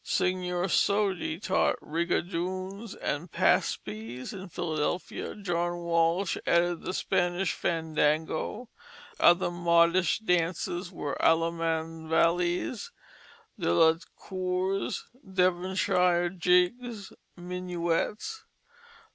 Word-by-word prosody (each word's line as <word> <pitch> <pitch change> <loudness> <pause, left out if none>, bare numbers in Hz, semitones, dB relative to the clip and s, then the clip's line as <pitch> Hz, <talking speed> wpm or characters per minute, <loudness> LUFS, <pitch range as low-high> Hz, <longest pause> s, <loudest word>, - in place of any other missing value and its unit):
Signor 180 -1 0
Sodi 195 -3 +1
taught 190 -1 +1
rigadoons 185 +5 -3
and 160 +3 -3
paspies 110 - 0
in 190 -1 -8
Philadelphia; 160 +1 -3
John 175 -3 -1
Walsh 170 +2 +1
added 170 0 +2
the - - -4
Spanish 180 0 0
fandango. 160 +6 -1 0.5
Other 175 0 +5
modish 170 +1 +3
dances 175 -2 -1
were 145 -5 -4
"Allemand 165 -1 +1
vally's, 175 +6 +1 0.7
De - - +1
la 160 - +6 0.2
cours, 185 +1 -2 0.2
Devonshire 180 -2 +2
jiggs, 190 +5 +1 0.2
Minuets." 180 - -2
175 Hz, 80 wpm, -28 LUFS, 165-185 Hz, 0.7 s, la